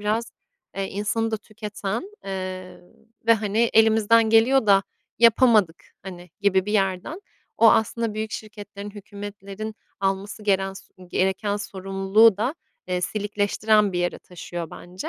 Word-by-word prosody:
biraz, 215 +3 -1 0.5
eee, 195 - -1
insanı 210 +3 -1
da 220 - 0
tüketen, 215 - -6
eee, 185 -1 -6 0.5
ve, 230 - +7
hani, 210 -1 -2 0.2
elimizden 220 0 +4
geliyor 230 +2 +4
da 195 -1 +5 0.4
yapamadık, 225 -6 +4 0.2
hani, 180 -2 -10
gibi 190 -2 +2
bir 210 - -2
yerden. 195 - -1 0.4
O 225 - +7
aslında 225 0 +1
büyük 215 0 -4
şirketlerin, 205 -1 -8
hükûmetlerin 205 +1 -8 0.3
alması 195 +2 -2
geren 195 -2 +1
s 195 - -12 0.2
gereken 190 +3 0
sorumluluğu 195 +2 +2
da, 240 +8 -1 0.3
eee, 180 0 -1
silikleştiren 210 +1 +1
bir 175 - -1
yere 175 0 -1
taşıyor 175 -2 -8
bence. 180 +2 -8
205 Hz, 130 wpm, -24 LUFS, 195-220 Hz, 0.5 s, ve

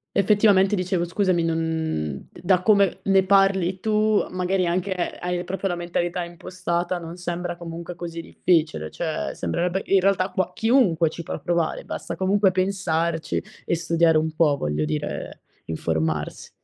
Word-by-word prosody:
Effettivamente 200 0 +4
dicevo, 180 -2 0
scusami, 180 -1 +1
non 160 - -2
d - - -14
da 185 0 +2
come 200 -3 +3
ne 195 -1 +4
parli 190 -1 +3
tu, 215 0 +2
magari 185 0 0
anche 180 +3 0 0.3
hai 180 0 -2
proprio 190 +2 -3
la 175 - -1
mentalità 175 +1 -2
impostata, 175 +1 -3
non 170 0 -8
sembra 175 0 -3
comunque 170 0 -7
così 170 -1 -6
difficile, 160 - 0
cioè, 160 - -3
sembrerebbe 180 +2 -1
in 195 - +4
realtà, 190 0 +2
qua 185 -2 -1
chiunque 210 - +3
ci 165 - -7
può 165 - -5
provare, 170 +2 -1
basta - - -5
comunque 195 +1 +3
pensarci 170 -4 -1 0.2
e - - 0
studiare 165 -1 +3
un 160 +1 0
po', 155 -3 +3
voglio 75 - -1
dire, 75 0 -4 0.2
informarsi. 80 -1 -2
175 Hz, 150 wpm, -24 LUFS, 165-190 Hz, 0.3 s, Effettivamente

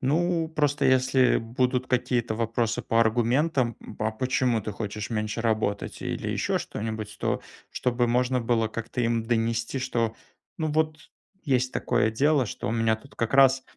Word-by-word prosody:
Ну, 165 +4 +1
просто, 145 -3 0
если 130 -1 +4
будут 125 +3 0
какие-то 120 -2 0
вопросы 115 0 -1
по 115 - +2
аргументам: 120 +3 +2
"М, - - -11
а 110 +1 +1
почему 125 0 0
ты 105 +1 -5
хочешь 105 0 -5
меньше 110 0 -2
работать?"- 110 -3 -1
Или - - -3
ещё - - 0
что-нибудь, 110 -1 -5
то - - 0 0.3
чтобы 120 -1 0
можно 125 +1 +1
было 115 -1 +1
как-то 115 +2 -4
им 115 -1 +1
донести, 115 +2 0
что, 115 -3 -1 0.4
ну 155 -1 0
вот 155 0 0 0.5
есть 130 -3 +1
такое 110 - +1
дело, 140 +2 +2
что - - -5
у - - 0
меня 115 -1 +2
тут 140 +5 -18
как 115 +2 -2
раз 135 -1 +6
120 Hz, 160 wpm, -26 LUFS, 115-130 Hz, 0.5 s, раз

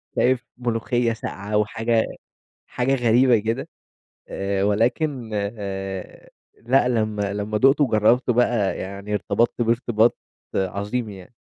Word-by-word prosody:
شايف 125 -1 +2
ملوخية 120 0 0
ساقعة، 105 -1 -4
و 105 - +3
حاجة 115 +1 0 0.6
حاجة 125 +2 0
غريبة 120 0 +4
كده 115 +5 -3 0.6
آآ، 100 0 -1
ولكن 120 +4 0
آآ، 100 -2 -5 0.3
لأ 125 +2 +3
لمّا 110 -4 -1
لمّا 105 +1 -2
دُقتُه 135 +4 +5
وجرّبته 120 +2 +3
بقى 120 -4 +1
يعني 100 +2 -6
ارتبطت 120 +3 0
بيه 115 - +1
إرتباط 120 -1 +2 0.4
عظيم 100 +5 -2
يعني. 95 +3 -12
115 Hz, 120 wpm, -23 LUFS, 105-120 Hz, 0.6 s, دُقتُه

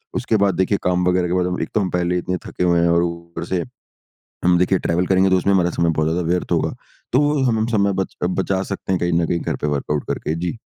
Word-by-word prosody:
उसके 110 - +1
बाद 95 -3 +2
देखिए 95 +2 +1
काम 90 0 +1
वगैरह 90 -1 +2
के 90 - -2
बाद 90 0 0
एक - - -3
तो - - +4
हम 95 - -1
पहले 90 0 0
इतने 90 +1 -2
थके - - -3
हुए 85 -1 +3
हैं 85 - +3
और 85 0 +3
ऊपर 85 -1 -5
से 90 -1 -1 0.8
हम 90 0 +5
देखिए 90 +1 +2
ट्रैवल 90 +2 0
करेंगे 95 0 +3
तो 95 - +4
उसमें 100 +2 +1
हमारा 90 -2 +3
समय 85 0 +1
बहुत 80 0 +2
ज़्यादा 85 -1 -1
व्यर्थ 90 +1 -1
होगा। - - +1 0.4
तो 130 - +5
वो 145 -1 +2
हमें 110 -3 +1
समय 100 -2 +2
बच 95 - -6
बचा 95 +1 0
सकते 95 - -4
हैं 90 - 0
कहीं 85 0 +1
न - - +1
कहीं 85 - 0
घर - - -2
पे 75 - 0
वर्कआउट 75 0 -1
करके। 80 - -2
जी। 85 +5 -3
90 Hz, 260 wpm, -20 LUFS, 85-95 Hz, 0.8 s, हम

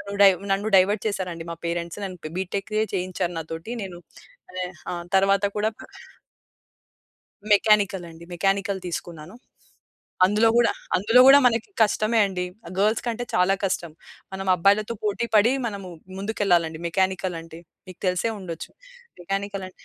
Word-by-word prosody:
నన్ను 200 0 -7
డైవ 195 -2 +7 0.2
నన్ను 200 +2 0
డైవర్ట్ 200 +3 +3
చేసారండి 180 -5 -4
మా 170 - -5
పేరెంట్స్. 170 +2 -3
నన్ను 185 -2 -6
ప్ 155 - -5
బీటెక్కే 200 +3 -2
చేయించారు 180 -1 -2
నాతోటి. 165 +6 -6
నేను 185 -3 -7 0.6
వే 185 - -1 0.3
ఆ! - - -3 0.2
తర్వాత 195 +1 +3
కూడా 210 +1 +1
పె - - -11 1.7
మెకానికల్ 205 -3 +3
అండి. 165 +1 -13
మెకానికల్ 195 +2 0
తీసుకున్నాను. 170 +1 -6 0.9
అందులో 210 +4 +3
గూడా 240 -1 +4 0.2
అందులో 225 +7 +4
గూడా 275 +1 +9
మనకి 230 - +1
కష్టమే 215 +1 +2
అండి. 185 -2 -3 0.2
ఆహ్, - - -9
గర్ల్స్ 215 +3 +2
కంటే 235 +1 -2
చాలా 180 +2 +3
కష్టం. 175 -4 -2 0.4
మనం 195 0 -5
అబ్బాయిలతో 205 +5 +2
పోటీపడి 215 +2 +2
మనము 200 -4 -5 0.3
ముందుకెళ్ళాలండి 180 -6 0
మెకానికల్ 185 0 0
అంటే. 165 0 -12 0.3
మీకు 185 - -12
తెలిసే 180 +5 +1
ఉండొచ్చు. 170 -3 -7 0.5
మెకానికల్ 195 +1 -3
అంటే - - -16
195 Hz, 140 wpm, -24 LUFS, 180-210 Hz, 1.7 s, గూడా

